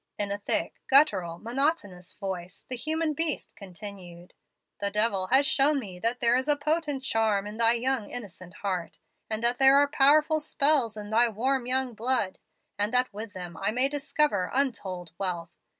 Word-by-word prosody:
In 205 -1 -1
a 200 - -3
thick, - - 0
guttural, 200 - +4
monotonous 225 - -2
voice, 185 -2 -7
the 255 - -2
human 310 +5 -1
beast 310 0 0
continued: 180 -2 -9 0.5
'The 200 - 0
devil 200 -2 +1
has 265 +5 +5
shown 280 +1 +2
me 190 -7 -8
that 230 +5 -1
there 235 0 +3
is 260 +2 -1
a 295 - +4
potent 295 -2 -2
charm 220 -5 0
in 210 +1 -8
thy 230 0 +4
young 240 -2 -1
innocent 185 -6 -8
heart, 180 -4 -3 0.3
that 235 +3 0
there 270 +1 +7
are 285 0 +5
powerful 300 +2 +3
spells 280 -6 +2
in 210 0 -8
thy 235 +2 +3
warm 250 +3 -1
young 260 -1 +1
blood, 225 -4 -2 0.4
and 205 +2 +1
that 250 -2 +2
with 210 +1 -7
them 175 -3 -7
I 195 - -1
may 250 +5 +2
discover 290 -8 0
untold 195 - -2
wealth. 175 -3 -3
230 Hz, 170 wpm, -27 LUFS, 195-270 Hz, 0.5 s, there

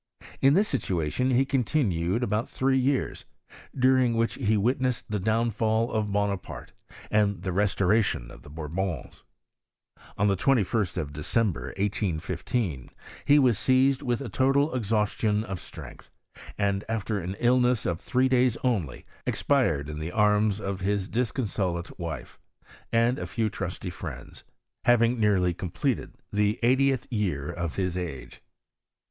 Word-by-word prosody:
In 135 +2 +5
this 205 +3 +3
situation 95 - -1
he 130 +1 +3
coritiQued 115 - 0
about 105 +1 -1
three 130 0 +1
years, 135 +1 0 0.5
during 130 -2 +4
which 115 0 +1
he 110 -4 +1
witnessed 125 +3 0
the 105 - 0
downfiJ 110 +2 +1
of 105 -2 -1
Bonaparte, 100 -2 -3 0.4
and 100 -4 +1
the 95 - -2
restoration 100 - +1
of - - -13
the - - -13
Bourbons. 80 +5 -4 1.0
Oa 105 - +2
the 100 -1 +3
2l3t 105 -4 +1
of 75 -4 -3
December, 80 - -1
1815, 95 - -2 0.4
he 145 +1 +6
was 125 -7 +4
seized 130 +1 +3
witb 120 0 -1
a - - -5
total 135 +7 +2
exhaustion 105 -2 0
of 95 -4 -5
strength; - - -11 0.5
and, 100 -1 0
after 110 -2 -1
an 90 +2 -4
illness 125 -1 +3
of 85 -1 -1
three 130 +1 +1
days 125 -2 +3
only, 100 - -1 0.2
expired 85 - +1
in 75 0 -6
the 80 +2 -4
arms 105 0 +2
of 100 -2 -3
his 100 0 -1
dis 120 0 -1
consolate 95 -9 -3
wife, 80 -5 -6 0.5
and 115 +4 +2
a - - -4
few 110 -2 -1
trusty 95 -2 -5
friends, - - -8 0.4
baviii|* 120 0 +4
nearlv 100 -6 +2
completed 85 -2 -2 0.2
the 105 +2 +2
eightieth 130 +2 +3
year 90 - -1
of 85 -2 -4
his 90 -2 -1
age. 75 -9 -6
105 Hz, 140 wpm, -27 LUFS, 90-125 Hz, 1.0 s, he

